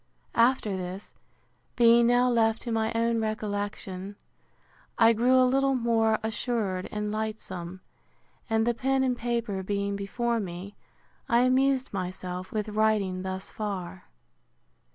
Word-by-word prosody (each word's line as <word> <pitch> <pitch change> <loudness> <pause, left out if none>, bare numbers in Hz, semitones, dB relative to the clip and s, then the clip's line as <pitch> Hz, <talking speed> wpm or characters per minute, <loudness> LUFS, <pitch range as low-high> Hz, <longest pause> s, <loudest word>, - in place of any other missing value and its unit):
After 230 -4 +2
this, 185 +2 -6 0.6
being 235 0 +6
now 245 +1 +4
left 225 -2 +2
to 235 - -4
my 220 0 0
own 230 0 +1
recollection, 205 -3 -4 0.8
I 230 0 +6
grew 250 +3 +4
a 255 - +6
little 270 +1 +2
more 225 -2 +2
assured 220 -4 -2
and 210 0 -3
lightsome; 190 -5 -5 0.7
and 225 0 +2
the 240 - +2
pen 265 +2 +1
and 255 -1 +1
paper 235 -5 -2
being 200 +1 -2
before 230 +4 -1
me, 190 0 -6 0.5
I 235 +1 +4
amused 260 0 +2
myself 185 -1 -5
with 215 0 -2
writing 210 -3 +1
thus 190 0 -5
far. 195 - -5
220 Hz, 130 wpm, -27 LUFS, 195-235 Hz, 0.8 s, being